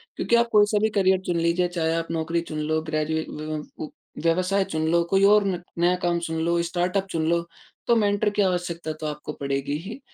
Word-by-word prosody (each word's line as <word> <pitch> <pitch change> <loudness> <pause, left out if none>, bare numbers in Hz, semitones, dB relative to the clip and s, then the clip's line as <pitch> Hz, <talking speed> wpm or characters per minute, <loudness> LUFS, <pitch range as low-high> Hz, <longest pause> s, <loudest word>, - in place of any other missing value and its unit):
क्योंकि 235 - +1
आप 235 0 +4
कोई 210 -1 +6
सा 210 - +3
भी 220 - +3
करियर 190 -1 +4
चुन 175 - 0
लीजिए 170 +2 +2
चाहे 165 -2 -1
आप 165 0 -2
नौकरी 165 +1 -1
चुन 155 - -4
लो 155 +1 0
ग्रेजुए 155 0 -1
व, 155 0 -5 0.2
अ, 155 - -3 0.4
व्यवसाय 185 +4 +2
चुन 160 -2 -2
लो 170 0 +3
कोई 195 +1 +3
और 205 +1 +6
न 180 -3 -2 0.2
नया 175 +1 +3
काम 175 -1 +1
चुन 160 0 -3
लो 170 0 +2
स्टार्टअप 180 +3 -1
चुन 160 -3 -1
लो 170 0 +2 0.5
तो 235 - +5
मेंटर 205 -1 +2
की 205 0 0
आवश्यकता 175 -4 -1
तो - - -3
आपको 150 0 -5
पड़ेगी 140 +1 -2
ही। 210 - -8
170 Hz, 220 wpm, -24 LUFS, 160-195 Hz, 0.5 s, कोई